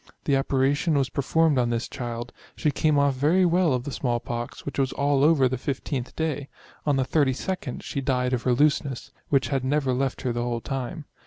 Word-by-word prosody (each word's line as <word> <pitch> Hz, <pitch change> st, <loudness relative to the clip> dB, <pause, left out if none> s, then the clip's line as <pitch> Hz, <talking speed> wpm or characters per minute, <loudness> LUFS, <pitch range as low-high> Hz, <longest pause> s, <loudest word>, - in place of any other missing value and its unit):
The 140 Hz, -, +3 dB
operation 140 Hz, +4 st, +1 dB
was 135 Hz, -2 st, +1 dB
performed 150 Hz, +1 st, +2 dB
on 120 Hz, -1 st, +1 dB
this 115 Hz, 0 st, -1 dB
child; 120 Hz, -2 st, -5 dB, 0.2 s
she 150 Hz, -, +1 dB
came 150 Hz, +1 st, +2 dB
off 140 Hz, -1 st, +3 dB
very 155 Hz, +8 st, +3 dB
well 175 Hz, -1 st, +3 dB
of 125 Hz, -1 st, 0 dB
the 145 Hz, -, -5 dB
small 120 Hz, -2 st, -1 dB
pox, 120 Hz, 0 st, -6 dB
which 140 Hz, -, -4 dB
was 135 Hz, -1 st, +1 dB
all 140 Hz, -1 st, +2 dB
over 150 Hz, -4 st, +5 dB
the 130 Hz, +1 st, -2 dB
1 -, -, -18 dB
5th 125 Hz, -1 st, -5 dB
day; 150 Hz, -3 st, -2 dB, 0.4 s
on 145 Hz, -, +3 dB
the 135 Hz, -1 st, +1 dB
32d 145 Hz, +2 st, -1 dB
she 140 Hz, -, -3 dB
died 125 Hz, -1 st, 0 dB
of 125 Hz, -, 0 dB
her 125 Hz, -, +2 dB
looseness, 140 Hz, -2 st, +1 dB, 0.2 s
which 135 Hz, -2 st, +2 dB
had 135 Hz, -2 st, 0 dB
never 135 Hz, -1 st, +1 dB
left 130 Hz, +1 st, -1 dB
her 125 Hz, -, 0 dB
the 120 Hz, -, -2 dB
whole 120 Hz, -1 st, -1 dB
time. 135 Hz, +6 st, -4 dB
135 Hz, 215 wpm, -25 LUFS, 125-145 Hz, 0.4 s, over